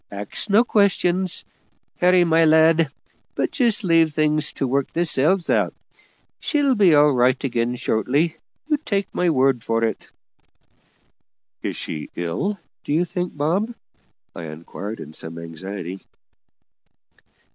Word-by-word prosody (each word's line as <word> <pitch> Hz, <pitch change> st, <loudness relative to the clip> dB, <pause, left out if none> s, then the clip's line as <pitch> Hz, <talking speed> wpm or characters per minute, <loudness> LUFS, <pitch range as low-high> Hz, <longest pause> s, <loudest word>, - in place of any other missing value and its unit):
Axe 100 Hz, -, -5 dB
no 210 Hz, +4 st, +5 dB
questions, 190 Hz, -5 st, +1 dB, 0.5 s
Harry, 180 Hz, 0 st, +5 dB
my 165 Hz, -1 st, +3 dB
lad, 160 Hz, 0 st, +4 dB, 0.5 s
but -, -, -1 dB
just 240 Hz, -5 st, +2 dB
leave 165 Hz, -4 st, +3 dB
things 150 Hz, 0 st, +1 dB
to -, -, -2 dB
work 135 Hz, +2 st, -1 dB
theirselves 170 Hz, +2 st, +1 dB
out; -, -, +1 dB, 0.6 s
she'll 290 Hz, -3 st, +1 dB
be 195 Hz, -9 st, +5 dB
all 145 Hz, 0 st, +5 dB
right 125 Hz, 0 st, +2 dB
again 120 Hz, -2 st, -1 dB
shortly, 140 Hz, +9 st, 0 dB, 0.3 s
you 300 Hz, 0 st, +1 dB
take 200 Hz, -7 st, -3 dB
my 180 Hz, -, +1 dB
word 130 Hz, -5 st, +2 dB
for 115 Hz, 0 st, 0 dB
it." 115 Hz, -, -2 dB, 1.5 s
"Is -, -, -3 dB
she 75 Hz, -, -6 dB
ill, 90 Hz, -, -2 dB, 0.3 s
do -, -, -2 dB
you 170 Hz, +3 st, +2 dB
think, 175 Hz, -1 st, -4 dB
Bob?" 190 Hz, +11 st, 0 dB, 0.6 s
I 85 Hz, -, -6 dB
inquired 85 Hz, +7 st, -7 dB
in 75 Hz, -, -9 dB
some 80 Hz, +1 st, -6 dB
anxiety. 90 Hz, +3 st, -7 dB
155 Hz, 130 wpm, -22 LUFS, 115-180 Hz, 1.5 s, no